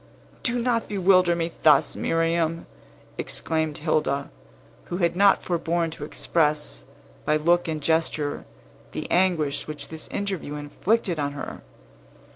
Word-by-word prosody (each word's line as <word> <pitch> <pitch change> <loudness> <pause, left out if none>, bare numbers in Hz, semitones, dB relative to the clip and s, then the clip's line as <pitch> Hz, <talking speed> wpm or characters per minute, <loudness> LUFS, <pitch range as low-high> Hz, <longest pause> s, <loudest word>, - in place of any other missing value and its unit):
"Do 245 -2 0
not 235 -1 0
bewilder 185 -3 +4
me 170 0 -2
thus, 150 -3 +5
Miriam!" 165 0 0 0.5
exclaimed 160 -2 -2
Hilda, 150 -3 0 0.5
who 175 - -4
had 170 -2 +1
not 200 +1 +5
forborne 170 -1 0
to 155 - -8
express, 150 - 0 0.4
by 150 - +2
look 175 +3 +2
and 155 -2 -3
gesture, 160 -2 0 0.5
the - - -4
anguish 170 -6 +1
which 150 -2 -7
this 160 -1 -7
interview 190 -7 -3
inflicted 175 +5 0
on 145 -1 -1
her. 145 - -7
165 Hz, 125 wpm, -25 LUFS, 150-175 Hz, 0.5 s, thus